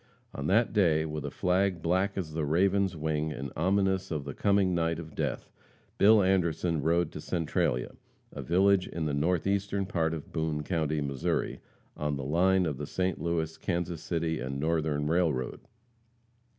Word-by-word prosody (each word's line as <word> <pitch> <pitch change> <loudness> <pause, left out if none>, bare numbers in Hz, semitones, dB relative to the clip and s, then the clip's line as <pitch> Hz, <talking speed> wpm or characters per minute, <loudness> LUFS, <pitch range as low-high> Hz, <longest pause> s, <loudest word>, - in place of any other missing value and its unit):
On 70 +1 -4
that 110 +6 +3
day, 80 -7 +3
with 75 -2 -4
a - - -2
flag 90 +2 0
black 95 +4 +1
as 80 -5 -4
the 80 0 -1
raven's 95 +4 +2
wing, 80 0 -1
and 70 -3 -5
ominous 95 +2 +1
of 75 -4 -3
the 70 - -5
coming 100 +1 +2
night 85 -1 0
of 80 -2 -8
death, - - -3 0.5
Bill 105 0 +6
Anderson 85 -3 +1
rode 85 +3 +1
to 75 - -7
Centralia, 75 -8 -1 0.4
a - - -6
village 95 +2 +3
in 85 -2 -4
the 75 - -1
northeastern 95 +6 0
part 80 -3 0
of 75 - -9
Boone 80 -2 -1
county, 80 -2 -1
Mo., 70 -1 -3 0.8
on 75 -1 -2
the 70 - -4
line 90 +6 +3
of 75 -5 -2
the 75 - -4
St. 90 0 -1
Louis, 80 -1 -1
Kansas 85 -2 -2
City 80 -2 -1
and 70 +1 -4
Northern 75 -1 0
Railroad. 80 -6 0
85 Hz, 165 wpm, -29 LUFS, 75-95 Hz, 0.8 s, Bill